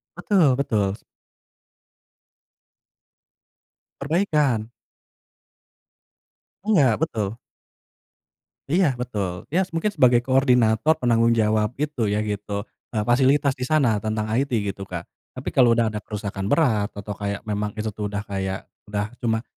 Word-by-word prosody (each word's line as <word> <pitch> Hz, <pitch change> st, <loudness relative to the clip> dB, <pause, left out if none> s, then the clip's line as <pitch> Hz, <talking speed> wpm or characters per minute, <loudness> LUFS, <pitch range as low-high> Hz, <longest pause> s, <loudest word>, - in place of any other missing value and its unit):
Betul 175 Hz, -10 st, +3 dB
betul 105 Hz, -8 st, 0 dB
s -, -, -21 dB, 3.0 s
Perbaikan. 145 Hz, -, +1 dB, 2.0 s
Enggak, 140 Hz, -, +4 dB
betul. 110 Hz, -7 st, -2 dB, 1.4 s
Iya 170 Hz, -6 st, +3 dB
betul, 100 Hz, -8 st, -4 dB
ya 180 Hz, -, +2 dB
s 165 Hz, -, -10 dB
mungkin 205 Hz, +6 st, 0 dB
sebagai 120 Hz, -8 st, +4 dB
koordinator 130 Hz, +1 st, +3 dB
penanggung 115 Hz, -4 st, +2 dB
jawab 110 Hz, +1 st, +1 dB
gitu 145 Hz, -6 st, -1 dB
ya 105 Hz, +1 st, 0 dB
gitu, 105 Hz, -1 st, -3 dB, 0.3 s
eee, 105 Hz, -, +1 dB
fasilitas 130 Hz, +3 st, +3 dB
di 125 Hz, -, -2 dB
sana 130 Hz, -9 st, +2 dB
tentang 110 Hz, +1 st, -2 dB, 0.2 s
IT 140 Hz, -, 0 dB, 0.2 s
gitu, 95 Hz, 0 st, -9 dB
Kak. 85 Hz, -2 st, -5 dB, 0.3 s
Tapi -, -, -4 dB
kalau 120 Hz, -3 st, +5 dB
udah 115 Hz, -2 st, +2 dB
ada 105 Hz, -, -4 dB
kerusakan 100 Hz, -2 st, -5 dB
berat, 115 Hz, -8 st, +2 dB
atau 100 Hz, +1 st, -6 dB
kayak 100 Hz, +1 st, -4 dB
memang 105 Hz, -1 st, -3 dB
itu 110 Hz, 0 st, -3 dB
tuh 105 Hz, 0 st, -4 dB
udah 105 Hz, 0 st, -4 dB
kayak, 95 Hz, -1 st, -4 dB, 0.2 s
udah, 105 Hz, +1 st, -3 dB
cuma 115 Hz, -1 st, 0 dB
110 Hz, 125 wpm, -23 LUFS, 105-135 Hz, 3.0 s, kalau